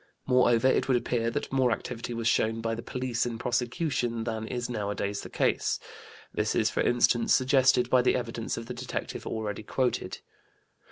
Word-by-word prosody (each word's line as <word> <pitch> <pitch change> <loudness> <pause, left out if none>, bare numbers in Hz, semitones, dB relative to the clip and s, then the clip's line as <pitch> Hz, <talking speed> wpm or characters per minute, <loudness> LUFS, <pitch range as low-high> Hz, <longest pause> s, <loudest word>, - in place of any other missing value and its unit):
Moreover, 125 -1 +4
it 130 - +2
would 130 -2 +4
appear 115 -1 0
that 115 - -4
more 130 -2 +3
activity 120 +1 -4
was 115 0 -1
shown 115 0 +2
by 115 0 -1
the 115 - -4
police 125 -1 -2
in 115 -1 -4
prosecution 120 0 -1
than 110 -1 -3
is 120 0 -3
nowadays 100 -3 -2
the - - -9
case; - - 0 0.5
this - - 0
is, - - +2
for - - 0
instance, 120 -1 +3
suggested 130 -1 +4
by 125 0 +4
the 125 - +3
evidence 115 -2 -3
of 115 - -5
the 125 - -6
detective 125 +1 -5
already 110 -2 -3
quoted. 125 +4 -1
120 Hz, 175 wpm, -28 LUFS, 115-125 Hz, 0.5 s, Moreover